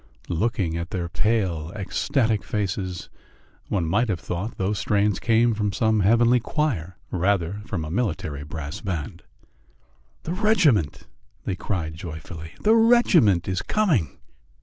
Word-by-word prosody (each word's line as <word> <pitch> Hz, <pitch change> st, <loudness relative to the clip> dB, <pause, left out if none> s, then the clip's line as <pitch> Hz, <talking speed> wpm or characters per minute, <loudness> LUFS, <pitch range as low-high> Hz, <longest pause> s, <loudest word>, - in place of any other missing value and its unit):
Looking 90 Hz, -2 st, 0 dB
at 85 Hz, +1 st, -4 dB
their 90 Hz, -2 st, -3 dB
pale, 90 Hz, -5 st, 0 dB
ecstatic 110 Hz, +2 st, 0 dB
faces, 95 Hz, -3 st, -3 dB, 0.6 s
one 90 Hz, -5 st, 0 dB
might 110 Hz, +8 st, +1 dB
have 90 Hz, -4 st, -1 dB
thought 95 Hz, +6 st, -4 dB
those 95 Hz, +2 st, -1 dB
strains 105 Hz, -2 st, +1 dB
came 115 Hz, 0 st, +3 dB
from 105 Hz, -1 st, -1 dB
some 110 Hz, +3 st, +2 dB
heavenly 115 Hz, +5 st, +4 dB
choir 115 Hz, -, -2 dB
rather 90 Hz, -1 st, +1 dB
than 105 Hz, +1 st, -7 dB
from 85 Hz, -7 st, -3 dB
a 75 Hz, -, -6 dB
military 80 Hz, -, -2 dB
brass 75 Hz, +5 st, -6 dB
band. 85 Hz, -9 st, -4 dB, 1.0 s
"The 165 Hz, -, -3 dB
regiment!" 180 Hz, -, +2 dB, 0.4 s
they 95 Hz, -, -1 dB
cried 85 Hz, -5 st, -3 dB
joyfully. 80 Hz, 0 st, -8 dB
"The 215 Hz, -, +5 dB
regiment 225 Hz, -, +4 dB
is 95 Hz, -1 st, -1 dB
coming!" 165 Hz, -, +1 dB
100 Hz, 135 wpm, -24 LUFS, 85-115 Hz, 1.0 s, The